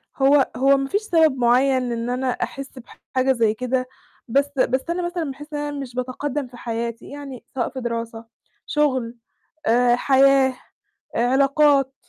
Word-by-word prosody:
هو 275 0 +4
هو 275 +1 +4
ما 275 0 -2
فيش 405 - 0
سبب 320 -9 +3
معيّن 250 +1 +2
إن 235 0 -3
أنا 255 +1 -1
أحس 275 +1 -6 0.4
بحاجة 260 +1 +3
زي 230 -4 +2
كده 255 +2 -2 0.4
بس 275 +4 +2
بس 260 +6 +1
أنا 345 +1 -1
مثلًا 345 -1 -3
باحس 295 +3 -11
إن 295 - -2
أنا 290 -1 -4
مش 255 -3 -7
باتقدّم 260 +2 -3
في 245 0 -14
حياتي 235 0 -5
يعني 280 -3 -9
سواء 245 - -1
في 265 - -7
دراسة، 230 -1 -4 0.4
شُغل 260 -6 0 0.5
آآ 240 +1 +4
حياة 270 +1 +4 0.6
آآ 235 +1 +2
علاقات، 275 0 +3
265 Hz, 160 wpm, -22 LUFS, 245-280 Hz, 0.6 s, هو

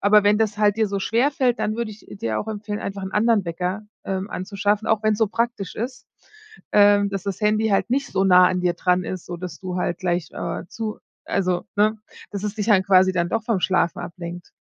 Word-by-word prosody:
aber 210 +1 +5
wenn 205 +1 +5
das 215 -2 0
halt 205 -1 +3
dir 220 -1 +2
so 200 0 -2
schwerfällt, 250 +3 +1
dann 215 - -1
würde 235 -2 -2
ich 210 - -13
dir 110 -1 -1
auch 220 - -7
empfehlen, 210 -1 -4
einfach 195 0 -5
'n 190 0 -5
anderen 220 -1 +3
Wecker, 180 +4 -3 0.2
ähm, 195 +1 -3
anzuschaffen, 200 +3 -1
auch 220 -1 +2
wenn's 215 -1 +2
so 220 - +3
praktisch 230 -4 -2
ist, 250 +3 -5 0.7
ähm, 205 0 +5
dass 195 -2 -3
das 200 +2 -4
Handy 215 +1 +2
halt 195 +1 +1
nicht 275 +2 0
so 195 0 0
nah 180 -1 +7
an 180 -1 -1
dir 180 -1 +1
dran 180 +1 +1
ist, 185 -2 -5
so 175 - -5
dass 175 -2 -7
du 185 -1 -4
halt 175 -1 -1
gleich, 175 -2 -1
äh, - - -4
zu 220 -2 -5 0.3
also, 185 -2 0
ne, 215 +1 +3 0.3
dass 200 0 -5
es 210 0 -2
dich 210 0 -2
dann 205 -4 +5
quasi 190 0 +5
dann 170 -1 0
doch 225 -1 0
vom 225 -3 +1
Schlafen 185 -2 +1
ablenkt. 175 0 -8
200 Hz, 225 wpm, -23 LUFS, 185-215 Hz, 0.7 s, nah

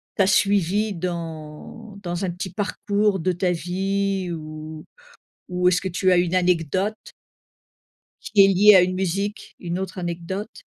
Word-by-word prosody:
t'a 195 -3 +3
suivie 200 +1 +2
dans 170 +4 -7
dans 175 +1 -3
un 180 - -2
petit 180 +1 -6
parcours 205 +1 0
de 185 +3 0
ta 180 +1 0
vie 190 +2 -1
ou-ou 155 - -9 0.6
est-ce 180 0 +3
que 190 - -3
tu 185 +1 +1
as 180 - +5
une 175 +1 +1
anecdote? 180 +3 +1 1.3
Qui 205 -2 +4
est - - +4
liée 200 +2 +7
à 185 - +8
une 185 +1 0
musique. 195 +3 -3
Une 175 0 -4
autre 190 0 -5
anecdote? 180 - -5
185 Hz, 145 wpm, -23 LUFS, 175-200 Hz, 1.3 s, à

